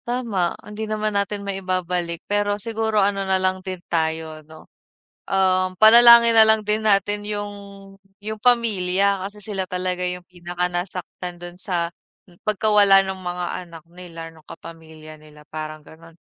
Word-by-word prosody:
Tama, 230 -8 -2
hindi 215 +1 -6
naman 215 0 -2
natin 200 0 -2
maibabalik, 180 -3 -3
pero 205 0 0
siguro 220 -1 0
ano 200 0 -1
nalang 185 -1 0
din 185 0 -6
tayo 160 -1 -2
'no, 160 0 -14 0.6
um, 185 -1 +1
panalangin 235 +2 +8
nalang 220 0 +6
din 210 +1 0
natin 205 0 +2
yung 205 -1 -4 0.7
yung 215 +1 -6
pamilya. 200 -5 +1
Kasi 205 +1 -10
sila 195 -3 -3
talaga 180 -1 -3
yung 180 0 -5
pinaka 180 0 -4
nasaktan 180 0 -5
dun 175 0 -10
sa 170 -3 -2 0.6
pagkawala 205 -2 +4
ng 190 0 -5
mga 180 0 -4 0.2
anak 165 -2 -13
nila, 170 -2 -10
nung 160 -1 -20
kapamilya 160 -1 -12
nila 150 0 -17
parang 155 0 -6
ganon. 165 +1 -17
185 Hz, 140 wpm, -22 LUFS, 175-210 Hz, 0.7 s, panalangin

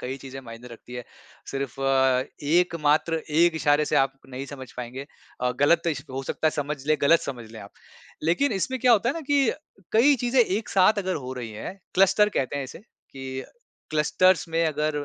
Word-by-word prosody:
कई 130 +2 -4
चीज़ें 135 0 -9
मायने 120 0 -11
रखती 120 +1 -12
है। 125 -1 -6 0.5
सिर्फ़ 135 -3 -4 0.7
एक 170 +4 +2
मात्र 150 +2 +2 0.3
एक 170 -1 +5
इशारे 150 -1 +3
से - - 0
आप 135 0 +3 0.2
नहीं 135 +1 -6
समझ 130 -3 -9
पाएँगे 125 +3 -6 0.3
अ, 125 0 +1
गलत 170 +4 +4
इश 150 -4 -1
हो 135 +1 -4
सकता 145 - -2
है - - +4
समझ 150 0 -3
लें 155 - +3
गलत 165 +4 +5
समझ 120 -5 -7
लें 110 -1 -10
आप। 100 - -12 0.5
लेकिन 175 - +2
इसमें 240 +7 -2
क्या 250 -2 +5
होता 230 +1 +3
है - - +2
ना 330 - -4
कि 280 -4 +2 0.4
कई 255 +7 +5
चीज़ें 245 +1 +2
एक 215 -1 0
साथ 200 +2 +4
अगर 185 -1 -1
हो 130 -3 -5
रही 125 -3 -6
हैं, 110 - -7 0.2
क्लस्टर 195 +2 +4
कहते 135 +1 -2
हैं 140 - -2
इसे 130 - -10
कि 130 -10 -9 0.5
क्लस्टर्स 165 +3 +2
में 165 +1 +1
अगर 150 -1 -1
150 Hz, 200 wpm, -25 LUFS, 130-185 Hz, 0.7 s, एक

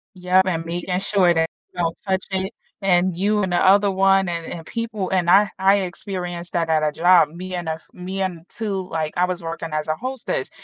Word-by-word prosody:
Yeah, 185 +1 +3
and 165 -3 -1
making 175 +2 -2
sure 190 -3 +3
that 160 0 +1 0.2
you - - -6
don't 165 -1 -1
touch 190 0 0
it, 190 +1 -1 0.3
and 180 -2 +2
you 205 +3 +1
and 185 - -1
the 175 - +2
other 200 +1 +5
one, 195 0 +3
and 170 -1 -3
and 165 -2 -8
people 225 -5 -3
and 180 -2 +2
I 200 +2 +6
I 195 +1 +5
experienced 180 -2 -4
that 165 -1 0
at 155 -1 +2
a 150 - +2
job. 170 0 +5
Me 180 +3 -7
and 175 -2 -4
a - - +1
f 160 - -14
me 185 +2 -6
and 180 -3 -3
too, 195 -4 -4
like, 160 -1 -2
I 180 - +3
was 180 -1 -2
working 165 0 -4
as 155 0 -2
a 155 - 0
hostess. 260 - -4
180 Hz, 225 wpm, -22 LUFS, 170-195 Hz, 0.3 s, I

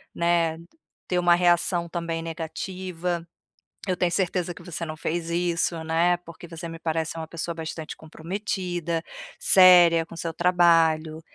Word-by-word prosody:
né. 170 -1 +1 0.5
Ter 180 - +1
uma 175 -1 +5
reação 175 0 +2
também 165 -1 -3
negativa, 175 +1 -4 0.6
eu 185 - +2
tenho 175 -1 +1
certeza 180 -1 -1
que 180 - -13
você 170 0 -5
não 155 0 -6
fez 165 +1 -3
isso, 170 -1 -1
né, 165 +2 +2
porque 170 0 -12
você 165 +1 -8
me 165 0 -8
parece 160 -1 -2
ser 165 - -9
uma 160 -1 -6
pessoa 170 0 -4
bastante 160 -1 -6
comprometida, 175 0 -4 0.4
séria 175 -3 +6
com 170 - -11
seu 165 0 -4
trabalho. 165 -2 +3
170 Hz, 150 wpm, -25 LUFS, 165-175 Hz, 0.6 s, séria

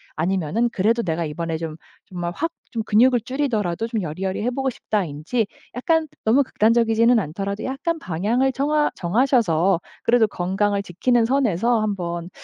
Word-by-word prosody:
아니면은 185 +6 0
'그래도 230 +4 +1
내가 165 -2 -1
이번에 160 +2 -3
좀 160 -1 -5 0.3
정말 175 -2 -4
확 330 +2 -2 0.2
좀 225 -2 -2
근육을 240 +3 +4
줄이더라도 225 -7 -1
좀 225 -2 -2
여리여리해 190 +8 -2
보고 265 +1 -1
싶다.'인지 200 - -2 0.3
약간 320 +5 +1 0.2
너무 245 +6 +4
극단적이지는 230 0 +3
않더라도 200 +4 -4
약간 305 +6 -2
방향을 220 - 0
정하 295 +3 +1
정하셔서 195 - +2 0.2
그래도 235 -2 +4
건강을 200 +2 -1
지키는 230 +6 +1
선에서 235 -3 +2
한번 175 -5 -3
215 Hz, 365 characters per minute, -22 LUFS, 175-245 Hz, 0.3 s, 근육을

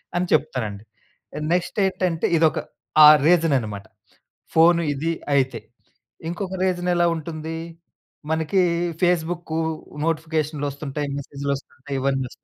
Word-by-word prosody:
అని 175 +1 +1
చెప్తానండి. 115 -9 -1 0.7
నెక్స్ట్ 180 +3 -1
ఏంటంటే 180 -3 0
ఇదొక 160 -1 +3 0.5
ఆ - - +11 0.2
రీజన్ 165 -4 +4
అన్నమాట. 105 -4 -6 0.7
ఫోను 170 +1 +6
ఇది 155 +4 -2 0.2
అయితే. 130 -4 +1 0.7
ఇంకొక 185 +2 -4
రీజన్ 180 -1 0
ఎలా 175 0 +3
ఉంటుంది? 160 0 -5 0.7
మనకీ 160 +4 +1 0.4
ఫేస్‌బుక్కు, 170 -1 0 0.5
నోటిఫికేషనులోస్తుంటాయి, 150 -3 -2
మెసేజులోస్తుంటాయి 140 0 -5
ఇవన్నీ 135 -1 0
ఒస్తాయి. - - -18
160 Hz, 100 wpm, -23 LUFS, 140-170 Hz, 0.7 s, ఆ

